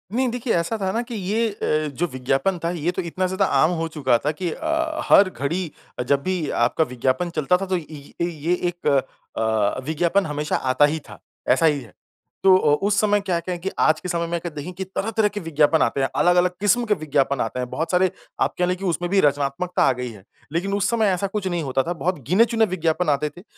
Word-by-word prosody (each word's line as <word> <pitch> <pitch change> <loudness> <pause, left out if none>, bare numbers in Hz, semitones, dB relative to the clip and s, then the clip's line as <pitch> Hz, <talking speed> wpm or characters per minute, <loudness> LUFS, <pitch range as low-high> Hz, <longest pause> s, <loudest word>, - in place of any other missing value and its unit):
नहीं 260 0 +2
देखिए 245 0 -1
ऐसा 170 +7 0
था 190 0 0
न - - +1
कि 235 -1 -7
ये 215 +4 0
अ, 155 -6 -1
जो 175 +6 0
विज्ञापन 135 +8 0
था - - +1
ये 170 0 -1
तो 185 - -3
इतना 180 +2 -2
ज़्यादा 190 +1 +1 0.2
आम 160 +3 +4
हो 165 - -1
चुका 130 -5 +3
था 150 - +2
कि 175 +2 -3
अ, 320 - -2
हर 195 -1 +7
घड़ी 165 +2 -3 0.3
अ, - - 0
जब 140 +2 +1
भी 185 -5 -1
आपका 140 +6 +2
विज्ञापन 130 +7 0
चलता 165 +5 +3
था 195 - -4
तो 185 -1 0
ये 160 - -7 0.4
ये 175 - 0
ये 160 +3 -1 0.2
एक 175 -3 -6
अ, 110 -5 0
विज्ञापन 170 +5 +1
हमेशा 150 0 -2
आता 130 +2 +3
ही 155 +2 -1
था। - - -11 0.3
ऐसा 165 - +4
ही 150 -3 +3
है। 115 - -14 0.5
तो 190 -1 +7
अ, 150 -5 +3
उस 205 -1 +2
समय 205 -1 +3
क्या-क्या 180 -2 -2
है - - -8
कि 190 - -2
आज 155 0 +4
के 180 - -6
समय 170 -1 -1
में 170 0 -1
अगर 175 - -5
देखें 150 +5 -5
कि 190 - -5
तरह-तरह 210 +3 0
के 205 0 -5
विज्ञापन 160 -2 +2
आते 140 - +1
हैं। 135 - +2
अलग-अलग 175 0 +3
किस्म 235 +4 +2
के 210 - +2
विज्ञापन 140 -5 0
आते 115 +3 -3
हैं। 125 -1 -3
बहुत 160 +4 -3
सारे 185 0 +3 0.3
आप - - +2
कह 180 - +3
रहे 180 - 0
कि 190 +1 -7
उसमें 175 0 -1
भी 200 - +4
रचनात्मकता 145 +5 +1
आ - - +5
गई 125 0 -5
है। 100 -3 -14 0.3
लेकिन 185 +5 -1
उस 200 -1 +1
समय 225 -3 +2
ऐसा 195 +2 -1
कुछ 195 -1 -3
नहीं 175 -3 -1
होता 135 -1 0
था। 175 - -2
बहुत 170 +2 -2
गिने-चुने 225 +5 +4
विज्ञापन 165 -1 0
आते 150 +1 +1
थे 180 - -11
175 Hz, 240 wpm, -22 LUFS, 145-190 Hz, 0.5 s, हर